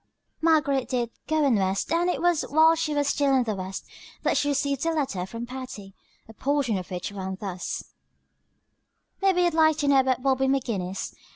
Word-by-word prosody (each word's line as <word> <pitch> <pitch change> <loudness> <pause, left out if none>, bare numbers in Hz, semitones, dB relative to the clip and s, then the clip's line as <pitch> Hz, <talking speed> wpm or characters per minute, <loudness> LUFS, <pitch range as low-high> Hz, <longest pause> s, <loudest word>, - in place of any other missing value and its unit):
Margaret 300 -5 +2
did 240 -2 -1 0.2
"go 310 -1 +2
on 255 -6 +3
west," 190 +7 0
and 345 +2 +2
it 355 - -2
was 350 -3 +3
while 315 +3 +6
she 320 -2 -1
was 290 -1 +1
still 280 -1 +2
in 255 - +3
the 220 -2 -2
west 190 0 -6 0.4
that - - +2
she 290 +1 +1
received 280 -1 0
a - - +2
letter 230 - -2
from 230 +3 -6
Patty, 250 -6 -8 0.3
a 225 - -12
portion 275 -2 0
of 180 - -9
which 180 +2 -4
ran 190 -1 -5
thus: 185 -3 -4 1.4
"Mebbe 390 -1 +3
youd 350 -2 +3
like 315 -1 +4
to 290 - -1
know 280 -1 +5
about 260 -2 +1
Bobby 265 -1 +2
McGinnis. 220 -9 -2
265 Hz, 190 wpm, -26 LUFS, 215-300 Hz, 1.4 s, while